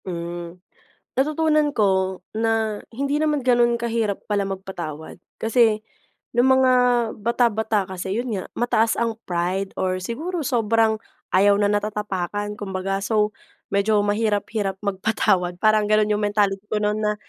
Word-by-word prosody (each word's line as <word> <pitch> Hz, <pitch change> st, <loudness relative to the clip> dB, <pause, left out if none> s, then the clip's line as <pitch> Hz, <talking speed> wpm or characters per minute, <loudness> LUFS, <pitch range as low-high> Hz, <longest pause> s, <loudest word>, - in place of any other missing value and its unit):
Hmm, 170 Hz, -1 st, -6 dB, 0.6 s
natutunan 305 Hz, +2 st, +2 dB
ko 190 Hz, -5 st, +1 dB, 0.2 s
na 220 Hz, -1 st, 0 dB
hindi 280 Hz, +5 st, -1 dB
naman 300 Hz, -1 st, +1 dB
ganun 240 Hz, -2 st, +3 dB
kahirap 230 Hz, -3 st, -1 dB
pala 205 Hz, -1 st, +1 dB
magpatawad. 190 Hz, -5 st, -6 dB, 0.2 s
Kasi 225 Hz, -1 st, +3 dB, 0.6 s
nung 250 Hz, +2 st, +4 dB
mga 260 Hz, -1 st, +4 dB, 0.4 s
bata-bata 220 Hz, -2 st, +1 dB
kasi 190 Hz, +3 st, -3 dB
yun 250 Hz, -, -3 dB
nga, 185 Hz, -, -3 dB
mataas 230 Hz, -2 st, +1 dB
ang 230 Hz, -1 st, 0 dB
pride 180 Hz, +2 st, -2 dB
or 185 Hz, 0 st, -1 dB
siguro 320 Hz, -, -3 dB
sobrang 225 Hz, -4 st, +2 dB, 0.3 s
ayaw 200 Hz, +2 st, +5 dB
na 205 Hz, 0 st, +2 dB
natatapakan 205 Hz, -1 st, -2 dB
kumbaga, 195 Hz, -1 st, -2 dB
so 210 Hz, +1 st, +1 dB, 0.4 s
medyo 200 Hz, +2 st, +2 dB
mahirap-hirap 205 Hz, -1 st, 0 dB
magpatawad. 195 Hz, -2 st, +1 dB
Parang 215 Hz, +3 st, +3 dB
ganon 215 Hz, 0 st, +3 dB
yung 210 Hz, 0 st, 0 dB
mentality 205 Hz, -1 st, +1 dB
ko 210 Hz, 0 st, -1 dB
nun 210 Hz, +1 st, 0 dB
na 210 Hz, 0 st, 0 dB
210 Hz, 130 wpm, -23 LUFS, 195-230 Hz, 0.6 s, ayaw